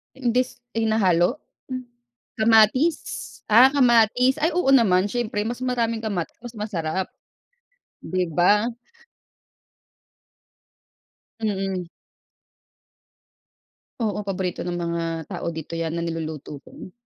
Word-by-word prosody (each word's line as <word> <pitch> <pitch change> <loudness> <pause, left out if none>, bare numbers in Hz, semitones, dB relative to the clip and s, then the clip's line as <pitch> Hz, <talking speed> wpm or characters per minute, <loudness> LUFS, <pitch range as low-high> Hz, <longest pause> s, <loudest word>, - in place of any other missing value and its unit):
Imbis 250 -1 -1
hinahalo? 215 -4 +2 0.3
Hmm, 255 -1 -5 0.6
kamatis? 225 +8 +5 0.5
Ah, 245 +5 +7
kamatis, 250 -1 +4
ay 320 - +3
oo 355 -6 +2
naman 195 -7 +4
siyempre, 215 -1 -2
mas 240 +2 -4
maraming 230 -3 -1
kamatis 200 -7 -3
mas 240 -1 -9
masarap, 185 -3 -2 1.0
'di 185 -1 -1
ba? 205 +7 +4 2.7
Mm. 195 -4 -2 2.1
Oo, 210 -2 -1
paborito 190 -3 -3
ng 175 0 -3
mga 170 0 -2 0.2
tao - - -4
dito 160 0 -7
yan 165 0 -2
na 170 - -2
niluluto 155 -3 -5
ko. 185 - -12
210 Hz, 100 wpm, -23 LUFS, 175-240 Hz, 2.7 s, Ah